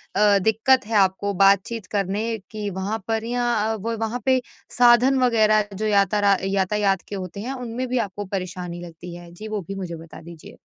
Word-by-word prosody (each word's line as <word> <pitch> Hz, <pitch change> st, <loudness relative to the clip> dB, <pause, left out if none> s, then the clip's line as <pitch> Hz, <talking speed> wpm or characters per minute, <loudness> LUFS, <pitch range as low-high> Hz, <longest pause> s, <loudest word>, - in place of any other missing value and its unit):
अ, 205 Hz, 0 st, +5 dB
दिक्कत 225 Hz, +4 st, +3 dB
है 225 Hz, -, -2 dB
आपको 195 Hz, +1 st, +2 dB
बातचीत 200 Hz, +3 st, +2 dB
करने 210 Hz, +3 st, -1 dB
की 210 Hz, -2 st, -4 dB
वहाँ 195 Hz, +3 st, -3 dB
पर? 225 Hz, -1 st, -1 dB
या 240 Hz, 0 st, 0 dB
अ, 220 Hz, 0 st, 0 dB
व 225 Hz, +2 st, -3 dB
वहाँ 225 Hz, +2 st, -2 dB
पे 260 Hz, -1 st, +3 dB, 0.4 s
साधन 245 Hz, +2 st, +5 dB
वगैरह 215 Hz, -3 st, +4 dB
जो 210 Hz, +3 st, -3 dB
याता 205 Hz, 0 st, +2 dB
रा 200 Hz, -1 st, +4 dB
यातायात 195 Hz, 0 st, +1 dB
के 205 Hz, -, -6 dB
होते 185 Hz, 0 st, -6 dB
हैं, 250 Hz, +5 st, -4 dB
उनमें 250 Hz, -1 st, -4 dB
भी 255 Hz, +1 st, -1 dB
आपको 205 Hz, -2 st, -4 dB
परेशानी 185 Hz, -2 st, -5 dB
लगती 170 Hz, +1 st, -10 dB
है? 175 Hz, -1 st, -12 dB
जी, 210 Hz, +6 st, -9 dB
वो 215 Hz, -1 st, -3 dB
भी 195 Hz, -, -5 dB
मुझे 180 Hz, -3 st, -5 dB
बता 165 Hz, 0 st, -12 dB
दीजिए। 170 Hz, -1 st, -13 dB
205 Hz, 195 wpm, -23 LUFS, 190-225 Hz, 0.4 s, अ